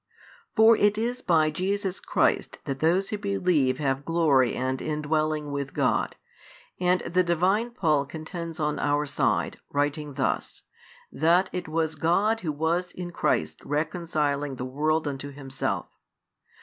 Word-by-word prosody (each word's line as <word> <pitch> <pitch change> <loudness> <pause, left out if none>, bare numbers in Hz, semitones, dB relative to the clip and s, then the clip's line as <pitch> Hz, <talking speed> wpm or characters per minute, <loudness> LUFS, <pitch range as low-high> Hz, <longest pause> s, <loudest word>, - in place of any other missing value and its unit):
For 225 +1 +7
it 205 0 +3
is 240 +3 -2
by 160 -6 +3
Jesus 190 +3 -2
Christ - - +1
that 135 -1 -3
those 175 +6 +2
who 210 - -3
believe 180 -10 +1
have 135 -2 -1
glory 150 -6 +3
and 130 +1 -2
indwelling 155 0 -1
with 140 -1 -4
God, - - +1 0.6
and 180 0 +2
the 180 +2 +1
Divine 185 +7 +1
Paul 155 - +1
contends 165 +1 -6
on 150 -1 0
our 145 +1 +1
side, 140 - 0
writing 145 0 -1
thus, 135 - -2 0.5
that 170 +5 +3
it 180 -1 -3
was 160 0 0
God 195 +9 +2
Who 165 -6 -2
was 165 +4 -1
in 175 -1 -6
Christ - - 0
reconciling 150 -2 -1
the 125 - -5
world 155 +4 0
unto 140 0 -5
Himself. 135 -1 -3
155 Hz, 140 wpm, -26 LUFS, 145-180 Hz, 0.6 s, For